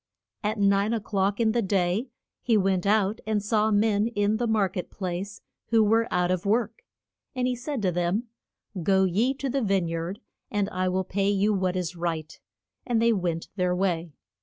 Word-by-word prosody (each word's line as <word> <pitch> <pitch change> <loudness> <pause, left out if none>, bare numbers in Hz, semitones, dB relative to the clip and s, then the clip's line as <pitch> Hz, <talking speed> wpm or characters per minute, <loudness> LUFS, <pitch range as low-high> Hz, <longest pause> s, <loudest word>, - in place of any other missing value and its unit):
At 215 +2 -1
nine 200 +2 +2
o'clock 200 -1 -1
in 225 -1 +3
the 235 +1 +1
day 195 +4 0 0.3
he 230 -3 +2
went 190 -1 +1
out 210 +1 +2
and 210 -2 0
saw 215 0 +2
men 210 0 +2
in 210 -2 0
the 240 +1 -1
mar 215 -3 +2
ket 180 0 -6
place 190 +1 -5 0.3
who 225 -1 +4
were 225 +2 +2
out 180 0 +1
of 185 -1 -1
work, 220 +2 0 0.5
and 250 -1 0
he 250 0 0
said 255 -1 -4
to 185 - +2
them, 175 +5 0 0.6
Go 190 +3 +3
ye 215 +9 +1
to 275 - -4
the 270 +1 0
vine 195 -5 +1
yard, 165 +5 -4 0.3
and 205 -2 0
I 185 0 0
will 190 +1 0
pay 195 +2 0
you 205 +1 +2
what 185 -2 0
is 180 -1 -2
right. 165 -3 -4 0.4
And 235 -2 0
they 230 0 +4
went 175 -4 -2
their 180 -1 +1
way. 175 -4 -1
200 Hz, 190 wpm, -26 LUFS, 185-220 Hz, 0.6 s, who